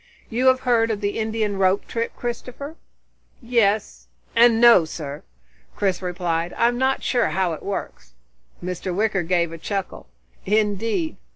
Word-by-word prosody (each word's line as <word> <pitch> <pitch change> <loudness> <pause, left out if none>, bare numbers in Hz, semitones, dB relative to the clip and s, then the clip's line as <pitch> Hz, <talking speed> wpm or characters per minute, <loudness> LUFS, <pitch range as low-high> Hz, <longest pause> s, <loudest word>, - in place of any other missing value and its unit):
"You 250 +3 +1
have 260 0 +5
heard 235 -3 +2
of 215 -2 -1
the 205 +1 -2
Indian 220 -2 -1
rope 190 +1 +2
trick, 230 0 -3
Christopher?" 250 +5 -6 0.6
"Yes 220 -4 0 0.3
and 230 -1 +6
no, 235 -7 +7
sir," 150 -2 -6 0.5
Chris 195 -2 0
replied. 175 -2 -2
"I'm 240 +1 +2
not 265 +1 +1
sure 245 -2 +2
how 185 -3 0
it 155 - -7
works." 200 - -6 0.5
Mr. 180 0 -3
Wicker 210 -1 +1
gave 170 -1 0
a 165 - -8
chuckle. 195 - -4 0.4
"Indeed? 215 - 0
210 Hz, 145 wpm, -22 LUFS, 185-235 Hz, 0.6 s, no